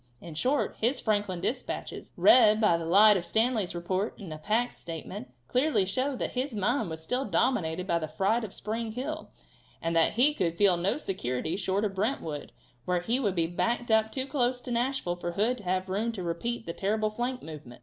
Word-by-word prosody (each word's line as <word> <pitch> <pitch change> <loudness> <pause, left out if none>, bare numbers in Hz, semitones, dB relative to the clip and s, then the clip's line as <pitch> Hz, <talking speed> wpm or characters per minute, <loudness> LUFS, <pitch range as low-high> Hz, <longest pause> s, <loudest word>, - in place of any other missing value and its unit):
In 170 - -9
short, 260 - 0
his 250 +4 +2
Franklin 205 -5 -1
dispatches, 250 +7 -4
read 215 -4 +7
by 210 -6 +4
the 165 -1 -3
light 205 +4 +7
of 175 - -3
Stanley's 220 -3 +1
report 185 +4 -2
and 190 -8 -8
of 155 0 -10
Hack's 230 +4 +1
statement, 165 -6 -7 0.2
clearly 255 -6 +2
show 260 +8 -1
that - - -3
his 255 -1 -3
mind 215 +1 0
was 160 0 -5
still 250 +10 -1
dominated 180 -4 0
by 170 -3 +1
the 155 - -4
fright 200 +9 0
of 210 - -5
Spring 220 +2 -4
Hill, 305 +6 -5 0.5
and 165 0 -2
that 165 -1 +4
he 265 +7 +4
could 170 - -1
feel 200 -2 +5
no 175 +8 0
security 155 - -2
short 195 +2 0
of 200 - -2
Brentwood, 190 - -3 0.3
where 180 -1 0
he 235 +8 +1
would 205 -8 0
be 165 -2 +2
backed 235 +8 -1
up 220 0 +3
too 260 -1 -2
close 255 -3 0
to 250 - -7
Nashville 240 -7 0
for 175 0 -4
Hood 230 +7 +1
to 205 - -13
have 185 +1 0
room 210 +5 -1
to 190 -5 -5
repeat 175 +8 -3
that 170 - -7
terrible 215 +2 0
flank 245 +3 -3
movement. 150 -7 -10
205 Hz, 205 wpm, -28 LUFS, 175-240 Hz, 0.5 s, read